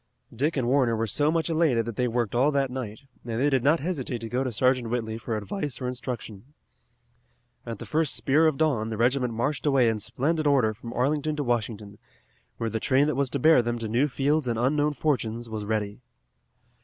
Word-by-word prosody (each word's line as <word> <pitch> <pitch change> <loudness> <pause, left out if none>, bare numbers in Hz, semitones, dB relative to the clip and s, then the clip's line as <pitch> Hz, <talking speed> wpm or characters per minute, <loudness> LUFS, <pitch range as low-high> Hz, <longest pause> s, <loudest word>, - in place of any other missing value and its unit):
Dick 145 +6 0
and 125 -3 0
Warner 125 -3 +3
were 115 +1 0
so 145 +7 +1
much 165 0 0
elated 155 -9 +2
that 115 -2 -5
they 125 +2 +1
worked 120 -2 -1
all 130 +5 +3
that 135 -2 +1
night, 125 -4 -6 0.2
and 115 -1 -3
they 145 +3 +2
did 130 -3 +2
not 150 +4 +4
hesitate 145 -7 -2
to 115 - -6
go 125 +3 0
to 130 - -2
Sergeant 125 +1 +1
Whitley 110 -2 -2
for 115 -1 -3
advice 145 - -4
or 125 - -3
instruction. 125 0 -6 1.1
At 115 -2 -4
the - - -8
first 155 -2 0
spear 155 +4 +3
of 155 -3 0
dawn 135 -8 +1
the 110 - -4
regiment 125 +1 +1
marched 145 +6 -1
away 135 -4 +4
in 110 -1 0
splendid 155 +8 -1
order 130 -7 +3
from 115 +2 -9
Arlington 150 +4 0
to 150 - -2
Washington, 110 -4 -3 0.6
where 115 -1 -2
the 110 - -1
train 135 +5 +3
that 150 -2 0
was 140 -1 +1
to 140 - -2
bear 155 0 +5
them 120 0 -2
to 115 -1 -4
new 120 +7 +2
fields 145 +1 0
and 115 -2 0
unknown 145 +5 +1
fortunes 120 -5 -1
was 110 -1 -4
ready. 105 +1 -2
125 Hz, 215 wpm, -26 LUFS, 115-145 Hz, 1.1 s, bear